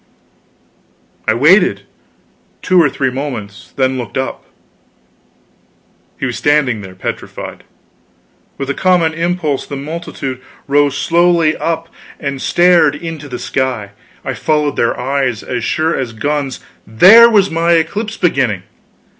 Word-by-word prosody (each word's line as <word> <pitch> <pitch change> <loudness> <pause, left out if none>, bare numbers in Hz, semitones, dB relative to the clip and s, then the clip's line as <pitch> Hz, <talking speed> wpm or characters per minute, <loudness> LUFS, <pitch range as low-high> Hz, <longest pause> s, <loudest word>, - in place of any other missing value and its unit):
I 110 - +3
waited 150 - +4 0.8
two 185 -1 +4
or 150 - +3
three 130 -1 -1
moments; 125 -7 -6
then 130 -1 0
looked 120 +1 -6
up; 70 - -4 1.7
he - - -2
was 120 -2 -3
standing 140 -7 +1
there 95 -2 -11
petrified. - - -6 0.9
With 135 - -4
a - - -1
common 175 -3 +2
impulse 165 -4 -2
the 140 - -6
multitude 140 -3 -6 0.3
rose 145 0 +2
slowly 170 -2 +2
up 165 0 -2 0.3
and 140 -3 -4
stared 175 -4 +4
into 155 -2 -7
the 125 - -5
sky. 125 -8 -2 0.3
I - - -2
followed 150 -2 0
their 115 - 0
eyes, 130 -3 -1
as 125 -3 -4
sure 160 +7 0
as 125 -4 -3
guns, 140 +3 -3 0.3
there 200 - +8
was 200 -4 +3
my 165 +1 +2
eclipse 205 +7 -1
beginning! 130 - 0
145 Hz, 130 wpm, -15 LUFS, 130-165 Hz, 1.7 s, there